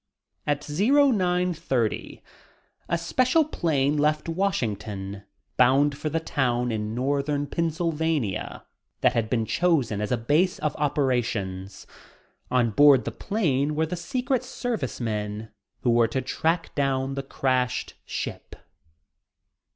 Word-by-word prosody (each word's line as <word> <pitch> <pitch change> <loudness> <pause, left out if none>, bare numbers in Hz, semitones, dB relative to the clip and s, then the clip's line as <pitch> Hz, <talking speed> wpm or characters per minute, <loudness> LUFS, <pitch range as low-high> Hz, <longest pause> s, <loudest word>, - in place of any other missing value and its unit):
At 145 0 -1
0930 180 - +1 0.7
a 170 - +2
special 255 - +2
plane 150 - 0
left 150 +1 +1
Washington, 105 - -2 0.3
bound 135 +3 +4
for 155 - -3
the 165 +2 0
town 125 -6 0
in 110 0 -3
northern 140 +3 0
Pennsylvania 160 - -1 0.4
that - - +4
had 115 -2 0
been 115 -2 +1
chosen 130 - +1
as 105 - -2
a 125 - +2
base 155 - +2
of 150 - -2
operations. 120 -10 -1 0.6
On 120 -3 +2
board 140 +3 +6
the - - -2
plane 150 -9 0
were 160 +1 +1
the 160 - -4
Secret 250 - -1
Service 245 - -3
men 105 -1 -3 0.3
who 120 - +2
were 115 0 +4
to 130 +4 -2
track 165 +1 -1
down 135 -1 0
the 135 - -2
crashed 130 -2 -1
ship. - - -6
140 Hz, 120 wpm, -25 LUFS, 120-165 Hz, 0.7 s, board